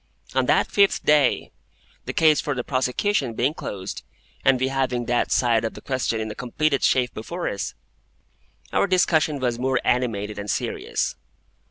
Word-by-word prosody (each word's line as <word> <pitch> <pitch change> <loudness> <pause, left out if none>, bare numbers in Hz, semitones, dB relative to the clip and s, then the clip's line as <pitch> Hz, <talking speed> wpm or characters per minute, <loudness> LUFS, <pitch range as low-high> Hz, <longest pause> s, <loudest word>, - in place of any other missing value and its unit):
On - - +1
that - - +4
fifth 200 -1 +3
day, 150 -3 +3 0.5
the - - -3
case 155 -2 +4
for 145 -2 -2
the 125 - -2
prosecution 130 - 0
being 130 +6 +1
closed, 95 -10 -6 0.4
and 135 -2 +4
we 130 +1 +1
having 130 -3 -1
that 120 0 0
side 115 -3 +3
of 115 - -3
the - - -9
question 130 -4 -1
in 110 -1 -3
a - - -5
completed 140 +5 -1
shape 125 -1 +2
before 170 +11 -5
us, 100 - -3 1.0
our - - +3
discussion 160 -5 +2
was 120 -3 -1
more 130 0 +1
animated 105 -5 0
and 100 0 -6
serious. - - -2
130 Hz, 165 wpm, -23 LUFS, 120-145 Hz, 1.0 s, that